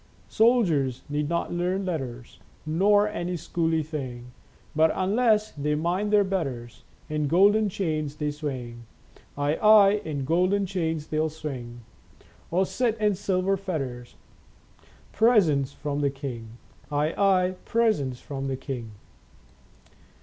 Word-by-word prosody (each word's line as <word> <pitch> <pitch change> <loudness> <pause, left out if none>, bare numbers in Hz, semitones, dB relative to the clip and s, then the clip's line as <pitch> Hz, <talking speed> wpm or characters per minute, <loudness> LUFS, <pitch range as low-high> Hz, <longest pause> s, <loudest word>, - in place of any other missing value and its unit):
Soldiers 170 - +2
need 145 0 -1
not 170 0 -1
learn 180 +3 -1
letters 130 -9 -5 0.3
Nor 205 +6 +3
any 180 -4 -3
school 165 0 -1
y 160 -1 +1
thing; 130 -6 -6 0.4
But, 160 +1 +4
unless 215 +2 +2
they 150 +1 -1
mind 180 +7 -1
their 210 -1 +5
betters, 135 - -4 0.2
In 150 -1 -1
golden 205 +6 +4
chains 155 -6 -2
they 150 -1 -2
swing. 125 -6 -6 0.5
Aye, 145 +2 0
aye, 210 -1 +6
in 145 -4 -4
golden 185 +6 +2
chains 165 -5 -2
they'll 155 +1 -1
swing. 130 -6 -7 0.7
Or 185 +3 +2
sit 230 +2 -1
in 210 -1 +2
silver 190 0 0
fetters, 135 -11 -5 1.0
Presents 165 - +3
from 145 0 -4
the 140 - +2
king. 120 -5 -7 0.3
Aye, 150 +2 0
aye, 185 -2 +2
presents 205 - +1
from 135 -1 -5
the 135 -1 -2
king." 120 -6 -6
160 Hz, 130 wpm, -26 LUFS, 140-195 Hz, 1.0 s, aye